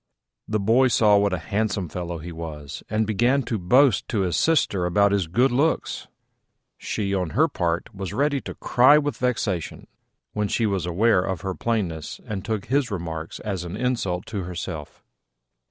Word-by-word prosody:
The 110 Hz, 0 st, 0 dB
boy 115 Hz, +6 st, +4 dB
saw 105 Hz, -4 st, +4 dB
what 100 Hz, 0 st, +2 dB
a 90 Hz, -, 0 dB
handsome 100 Hz, +2 st, -2 dB
fellow 85 Hz, +1 st, -5 dB
he 85 Hz, +2 st, -8 dB
was, 80 Hz, -3 st, -7 dB
and 110 Hz, +1 st, +1 dB
began 120 Hz, +6 st, +2 dB
to 115 Hz, -3 st, -2 dB
boast 125 Hz, +5 st, +4 dB
to 110 Hz, -5 st, 0 dB
his 90 Hz, -3 st, 0 dB
Sister 100 Hz, -, +2 dB
about 100 Hz, +3 st, +3 dB
his 100 Hz, -4 st, +1 dB
good 120 Hz, +11 st, +2 dB
looks: 145 Hz, +6 st, 0 dB, 0.7 s
she, 100 Hz, -2 st, -2 dB
on 90 Hz, -4 st, 0 dB
her 160 Hz, +2 st, +5 dB
part, 85 Hz, -, -2 dB
was 95 Hz, -2 st, -5 dB
ready 140 Hz, -1 st, 0 dB
to -, -, -8 dB
cry 130 Hz, +4 st, +5 dB
with 145 Hz, -2 st, -1 dB
vexation 110 Hz, -8 st, -2 dB, 0.5 s
when 105 Hz, -1 st, 0 dB
she 115 Hz, -, 0 dB
was 95 Hz, -5 st, -1 dB
aware 100 Hz, +3 st, +3 dB
of 95 Hz, -2 st, -3 dB
her 95 Hz, -1 st, -3 dB
plainness, 90 Hz, -9 st, -2 dB
and 100 Hz, -3 st, -4 dB
took 110 Hz, -3 st, -3 dB
his 135 Hz, +1 st, +1 dB
remarks 80 Hz, -5 st, -5 dB
as 95 Hz, -5 st, -3 dB
an 90 Hz, +3 st, -6 dB
insult 110 Hz, -8 st, -1 dB
to 105 Hz, -4 st, -4 dB
herself. 85 Hz, -3 st, -6 dB
100 Hz, 175 wpm, -24 LUFS, 90-120 Hz, 0.7 s, her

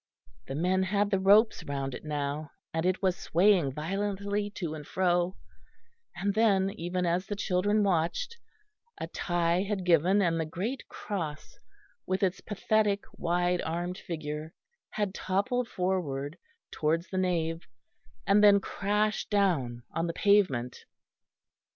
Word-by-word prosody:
The 135 Hz, -, -4 dB
men 180 Hz, +5 st, +1 dB
had 200 Hz, +2 st, +1 dB
the 195 Hz, -, +2 dB
ropes 205 Hz, +4 st, +5 dB
round 135 Hz, -1 st, -3 dB
it -, -, -7 dB
now, 145 Hz, 0 st, -3 dB, 0.2 s
and 165 Hz, +2 st, 0 dB
it 185 Hz, +1 st, 0 dB
was 185 Hz, -2 st, +3 dB
swaying 175 Hz, -6 st, +3 dB
violently 200 Hz, +5 st, -2 dB
to 170 Hz, -5 st, -3 dB
and 155 Hz, -1 st, -7 dB
fro; 175 Hz, +2 st, 0 dB, 0.8 s
and 200 Hz, +3 st, -1 dB
then, 195 Hz, -3 st, +3 dB
even 180 Hz, 0 st, -2 dB
as 175 Hz, +2 st, 0 dB
the 205 Hz, -, -3 dB
children 205 Hz, +2 st, +1 dB
watched, 195 Hz, -, 0 dB, 0.6 s
a -, -, -2 dB
tie 175 Hz, 0 st, 0 dB
had 195 Hz, -2 st, -2 dB
given, 180 Hz, +3 st, +4 dB
and 170 Hz, -4 st, +2 dB
the 160 Hz, -, 0 dB
great 215 Hz, +11 st, -4 dB
cross 160 Hz, -8 st, -5 dB, 0.5 s
with 185 Hz, +1 st, 0 dB
its 190 Hz, 0 st, 0 dB
pathetic 205 Hz, 0 st, +1 dB
wide 175 Hz, +1 st, +1 dB
armed 175 Hz, +3 st, -3 dB
figure 155 Hz, -1 st, -5 dB, 0.3 s
had 205 Hz, -3 st, -2 dB
toppled 230 Hz, +8 st, -1 dB
forward 170 Hz, -8 st, -2 dB, 0.4 s
towards 165 Hz, +3 st, 0 dB
the 185 Hz, -, 0 dB
nave, 165 Hz, -2 st, -1 dB, 0.6 s
and 205 Hz, +1 st, +4 dB
then 200 Hz, -1 st, +8 dB
crashed 210 Hz, +2 st, -1 dB
down 155 Hz, -, +1 dB
on 165 Hz, +1 st, -1 dB
the 170 Hz, -, -2 dB
pavement. 175 Hz, -, +2 dB
180 Hz, 140 wpm, -29 LUFS, 165-200 Hz, 0.8 s, then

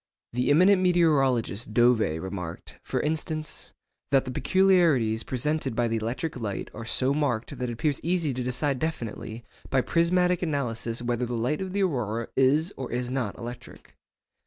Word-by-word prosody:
The 125 Hz, +3 st, 0 dB
eminent 185 Hz, +6 st, +5 dB
meteorologist 135 Hz, -, +2 dB
Dové 120 Hz, -9 st, +3 dB
remarked, 90 Hz, -2 st, -7 dB
for -, -, -2 dB
instance, 155 Hz, 0 st, -3 dB, 0.4 s
that 135 Hz, -1 st, +3 dB
'the 130 Hz, -, -4 dB
peculiarities 165 Hz, -, +3 dB
presented 135 Hz, 0 st, -1 dB
by 120 Hz, 0 st, +2 dB
the 115 Hz, 0 st, 0 dB
electric 125 Hz, +6 st, -3 dB
light 105 Hz, -4 st, -4 dB
are 115 Hz, +1 st, -7 dB
so 130 Hz, +4 st, +1 dB
marked 140 Hz, -6 st, -1 dB
that 125 Hz, -1 st, -2 dB
it -, -, -3 dB
appears 140 Hz, +4 st, 0 dB
easy 170 Hz, -4 st, 0 dB
to 125 Hz, -, -3 dB
decide 125 Hz, +2 st, -1 dB
definitely 120 Hz, -6 st, -4 dB, 0.3 s
by 135 Hz, -, +3 dB
prismatic 180 Hz, +3 st, +2 dB
analysis 120 Hz, -7 st, -2 dB
whether 120 Hz, 0 st, -1 dB
the 120 Hz, -, -3 dB
light 125 Hz, +9 st, -1 dB
of 190 Hz, -1 st, -4 dB
the 200 Hz, +1 st, +1 dB
aurora 115 Hz, -, -1 dB
is 150 Hz, +7 st, +3 dB
or 130 Hz, -, -5 dB
is 125 Hz, +1 st, -2 dB
not 125 Hz, -6 st, -2 dB
electric. 120 Hz, +1 st, -9 dB
130 Hz, 160 wpm, -27 LUFS, 115-155 Hz, 0.4 s, eminent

